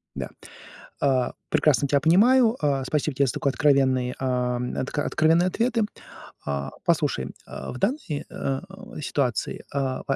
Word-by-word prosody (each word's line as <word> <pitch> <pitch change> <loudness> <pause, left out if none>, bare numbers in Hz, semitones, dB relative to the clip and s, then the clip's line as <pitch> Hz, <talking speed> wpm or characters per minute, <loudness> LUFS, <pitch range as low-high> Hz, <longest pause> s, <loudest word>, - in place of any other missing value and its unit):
Да, - - -4 0.7
а, 130 -3 +2 0.2
прекрасно 140 -2 +3
тя 140 0 +3
понимаю. 225 - +5
А 140 -2 +1
спасибо 150 +1 -1
тебе 140 +1 +3
за - - -1
такой 140 - 0
откровенный 130 -2 +2
а, 125 -1 0 0.2
откро 145 +2 -2
откровенные 165 +3 +3
ответы. 230 +3 +1 0.6
А 70 -1 -2
послушай, 150 - +1
а, - - -7
в 125 - -7
данной, 255 - -1
э, - - -10
а, 135 +4 -3 0.4
ситуации, 130 -6 -1
а, 135 -2 -1
140 Hz, 140 wpm, -25 LUFS, 130-165 Hz, 0.7 s, понимаю